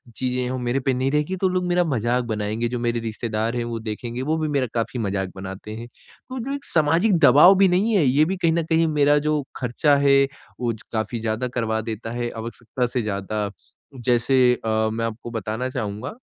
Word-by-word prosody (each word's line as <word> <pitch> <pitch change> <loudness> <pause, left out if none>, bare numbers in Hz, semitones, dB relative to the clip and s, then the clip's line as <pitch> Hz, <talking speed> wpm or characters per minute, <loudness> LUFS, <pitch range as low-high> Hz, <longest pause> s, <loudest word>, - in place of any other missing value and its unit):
चीज़ें 125 0 -1
हैं 125 - -2
वो 130 - -2
मेरे 125 +1 -1
पे 135 0 0
नहीं 130 +2 0
रहेंगी 150 +5 0
तो 190 - +4
लोग 180 0 0
मेरा 180 0 +3
मज़ाक 125 -5 0
बनाएँगे 110 +2 -2
जो 125 0 -3
मेरे 120 0 0
रिश्तेदार 115 +1 -3
हैं 120 - -1
वो 115 -1 -4
देखेंगे 115 +3 -5
वो 155 +4 0
भी 155 - -1
मेरा 140 -4 0
काफ़ी 120 +1 -2
मज़ाक 95 -3 -2
बनाते 95 +2 -7
हैं। 115 +1 -7 0.4
तो 260 0 -5
जो 255 +4 -4
एक 280 0 -6
सामाजिक 165 +5 +3
दबाव 150 +7 +8
भी 195 0 +6
नहीं 200 +5 +2
है 185 - +4
ये 140 +4 +4
भी 190 +4 -1
कहीं 170 -2 +2
न 170 0 +1
कहीं 165 0 +2
मेरा 145 -1 +3
जो 150 -1 +1
खर्चा 130 +4 +2
है 140 0 +6 0.4
वो 120 -1 0
ज 110 - -12
काफ़ी 110 +1 -2
ज़्यादा 110 +3 -1
करवा 110 -2 0
देता 115 0 -5
है 120 0 -2
आवश्यकता 120 +2 -3
से 125 +1 -2
ज़्यादा 105 0 -2 0.5
जैसे 125 +1 +3
अ, 110 0 +1
मैं 115 0 -1
आपको 115 +1 -6
बताना 110 +3 -3
चहूँगा, 110 -1 -4
125 Hz, 215 wpm, -23 LUFS, 110-150 Hz, 0.5 s, दबाव